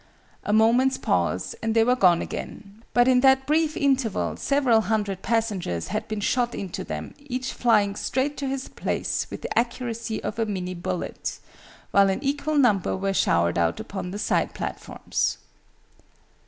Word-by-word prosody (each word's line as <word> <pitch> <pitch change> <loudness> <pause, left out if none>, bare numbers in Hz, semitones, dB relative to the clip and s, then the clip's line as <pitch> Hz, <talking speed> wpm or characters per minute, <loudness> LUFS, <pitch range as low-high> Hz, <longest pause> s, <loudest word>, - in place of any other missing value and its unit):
A - - -2
moment's 235 +5 +4
pause, - - 0
and 225 0 -1
they 225 - +5
were 250 +2 +3
gone 180 -8 +4
again; 210 +2 -8
but 245 0 +4
in 255 -1 +5
that 265 0 +4
brief 310 +1 +1
interval 270 -7 +1
several 265 -6 +2
hundred 205 -4 -1
passengers 205 - -1
had 215 - -3
been 215 -1 -3
shot 240 +2 0
into 190 -3 -5
them, - - -6
each 260 -2 -4
flying 210 -4 +2
straight 265 +6 -1
to 280 - -3
his 265 0 -3
place - - -2
with - - -8
the - - -4
accuracy 235 -1 -1
of 215 - -4
a 225 - +2
Minie 185 -3 -3
bullet 180 0 -4 0.5
while 200 0 +5
an 190 - -2
equal 290 +2 0
number 210 -10 +3
were 195 +1 -1
showered 85 - +2
out 85 0 +1
upon 190 -2 -5
the 195 - -5
side - - 0
platforms. - - -2
225 Hz, 165 wpm, -25 LUFS, 200-260 Hz, 0.5 s, they